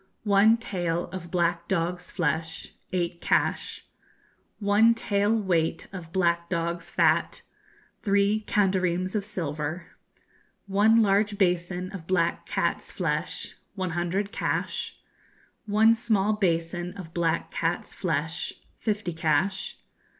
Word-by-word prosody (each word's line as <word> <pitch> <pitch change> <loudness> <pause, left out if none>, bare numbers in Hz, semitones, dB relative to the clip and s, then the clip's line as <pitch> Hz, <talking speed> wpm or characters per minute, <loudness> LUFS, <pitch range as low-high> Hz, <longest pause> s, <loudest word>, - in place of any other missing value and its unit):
One 210 +2 +5
tael 175 -7 -2
of 180 -2 -7
black 170 -1 0
dog's 180 0 -1
flesh 165 -2 -2 0.2
eight 175 -2 -2
cash. - - 0 0.7
One 215 +3 +4
tael 205 -2 +1
weight 170 -5 0
of 170 -4 -8
black 170 -2 +1
dog's 170 -1 -2
fat - - +2 0.6
three 200 +1 +2
kandareems 185 -2 +1
of 210 -2 0
silver. 160 -4 -4 0.7
One 215 +3 +4
large 205 +1 +2
basin 180 0 0
of 180 -5 -8
black 175 -2 +1
cat's - - -1
flesh - - -2 0.2
one 185 -3 -2
hundred 175 +4 -1
cash. - - -2 0.7
One 220 +2 +5
small 215 -3 +1
basin 175 -2 -1
of 165 -4 -9
black 170 -1 0
cat's 170 +1 -2
flesh 160 -1 -2 0.3
fifty 210 -5 -1
cash. 165 +4 0
185 Hz, 115 wpm, -27 LUFS, 170-205 Hz, 0.7 s, One